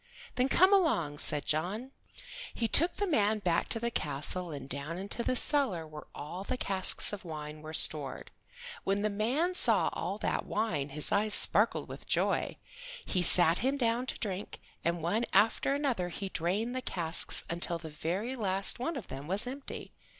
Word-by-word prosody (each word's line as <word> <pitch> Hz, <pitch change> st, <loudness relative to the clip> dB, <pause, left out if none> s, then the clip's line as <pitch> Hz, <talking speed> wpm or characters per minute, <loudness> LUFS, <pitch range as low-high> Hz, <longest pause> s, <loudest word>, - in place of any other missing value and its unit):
"Then, 255 Hz, +2 st, +1 dB
come 375 Hz, +6 st, +5 dB
along," 170 Hz, -, +2 dB
said 150 Hz, -1 st, -1 dB
John. 195 Hz, -, -2 dB, 0.6 s
He 230 Hz, -, 0 dB
took 335 Hz, -, +3 dB
the 410 Hz, -, -1 dB
man 220 Hz, -, +2 dB
back 175 Hz, -5 st, 0 dB
to 225 Hz, -, -1 dB
the 235 Hz, +1 st, -2 dB
castle 155 Hz, +3 st, 0 dB
and 140 Hz, -4 st, -7 dB
down 140 Hz, +5 st, -5 dB
into 200 Hz, +5 st, -3 dB
the 255 Hz, -, 0 dB
cellar 250 Hz, -, +1 dB
where 155 Hz, -1 st, -10 dB
all 175 Hz, +6 st, -6 dB
the 255 Hz, +5 st, -3 dB
casks 195 Hz, -2 st, +4 dB
of 205 Hz, -, -6 dB
wine 155 Hz, -2 st, -7 dB
were 155 Hz, 0 st, -8 dB
stored. 150 Hz, -3 st, 0 dB, 0.5 s
When 200 Hz, +1 st, 0 dB
the 215 Hz, -, +1 dB
man 255 Hz, -, 0 dB
saw 230 Hz, -, +5 dB
all 185 Hz, +5 st, -3 dB
that -, -, -1 dB
wine 170 Hz, -10 st, -1 dB
his 150 Hz, +2 st, -1 dB
eyes 210 Hz, +1 st, +3 dB
sparkled -, -, +3 dB
with -, -, -10 dB
joy. -, -, 0 dB, 0.5 s
He 185 Hz, -, 0 dB
sat 175 Hz, -1 st, +4 dB
him 270 Hz, +3 st, 0 dB
down 240 Hz, 0 st, 0 dB
to -, -, 0 dB
drink, 200 Hz, -2 st, -4 dB, 0.2 s
and 170 Hz, -1 st, -1 dB
one 210 Hz, +8 st, 0 dB
after 225 Hz, +7 st, +3 dB
another 255 Hz, -11 st, -1 dB
he 195 Hz, +3 st, -5 dB
drained 200 Hz, +9 st, -1 dB
the 255 Hz, -, 0 dB
casks 170 Hz, -7 st, 0 dB
until 170 Hz, 0 st, +1 dB
the 160 Hz, -2 st, -9 dB
very 185 Hz, -, -3 dB
last 195 Hz, -2 st, +1 dB
one 275 Hz, +5 st, -2 dB
of 230 Hz, -, -7 dB
them 135 Hz, +2 st, -8 dB
was 195 Hz, +6 st, 0 dB
empty. 270 Hz, +3 st, -7 dB
195 Hz, 180 wpm, -31 LUFS, 165-240 Hz, 0.6 s, come